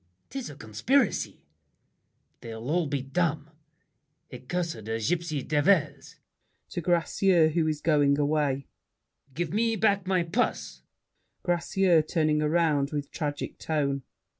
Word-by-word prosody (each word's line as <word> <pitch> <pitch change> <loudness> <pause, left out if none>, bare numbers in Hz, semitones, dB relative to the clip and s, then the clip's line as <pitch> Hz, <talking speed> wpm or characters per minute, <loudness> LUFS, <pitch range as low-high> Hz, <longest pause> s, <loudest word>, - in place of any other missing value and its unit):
'Tis 270 -2 -5
a 145 - -9
conspiracy. 190 - 0 0.9
They'll 115 +3 -6
all 170 -1 +1
be 140 -2 -2
dumb; 155 +1 -1 0.8
Accursed 165 +5 -3
gypsy 145 +6 -2
devils! 150 -2 +1 0.5
[To 175 - -4
Gracieux 175 0 +3
who 160 0 +1
is 155 -1 -2
going 145 -3 +3
away. 145 -2 0 0.7
Give 175 +1 -2
me 225 +1 +2
back 200 -2 +1
My 185 -2 +2
purse! 190 +9 -2 0.6
GRACIEUX 175 -2 +2
(turning 155 -2 +2
around, 150 -3 +2
with 145 -2 -4
tragic 145 -3 -4
tone). 140 -3 -1
155 Hz, 115 wpm, -27 LUFS, 145-175 Hz, 0.9 s, Gracieux